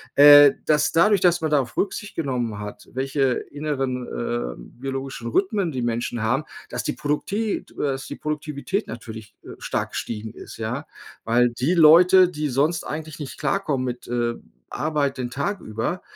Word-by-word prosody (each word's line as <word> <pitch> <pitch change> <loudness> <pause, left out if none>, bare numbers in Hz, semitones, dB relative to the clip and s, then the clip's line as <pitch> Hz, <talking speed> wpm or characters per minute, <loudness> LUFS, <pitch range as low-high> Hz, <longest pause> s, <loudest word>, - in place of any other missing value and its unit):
äh, 145 0 +9
dass 150 -1 +2
dadurch, 200 +5 +4
dass 175 -1 +3
man 160 -1 -1
darauf 135 -6 +1
Rücksicht 210 +1 -3
genommen 125 -8 -2
hat, 105 0 -8
welche 135 0 0 0.2
inneren, 135 -4 -3
äh, 120 - -3 0.3
biologischen 135 -3 -5
Rhythmen 190 - 0
die 130 - -2
Menschen 120 -1 -2
haben, 135 +7 0 0.2
dass - - -4
die - - -1
Produktivität, 200 +9 -2
äh, - - -21
dass 135 -2 -2
die - - -6
Produktivität 150 +6 -3
natürlich, 110 -2 -9
äh, - - -12
stark - - -2
gestiegen 110 -1 -5
ist, - - -11
ja. 120 +7 -4 0.4
Weil 120 +2 +3
die 125 +8 0
Leute, 180 +3 +7
die 150 -3 -3
sonst 145 +5 0
eigentlich 155 0 -6
nicht 145 -3 -7
klarkommen 150 -10 0
mit, 125 -1 -5
äh, 120 -1 -1 0.3
Arbeit 150 -3 -1
den 125 -1 -3
Tag 145 +10 -2
über, 115 +12 -3
140 Hz, 165 wpm, -23 LUFS, 120-155 Hz, 0.4 s, äh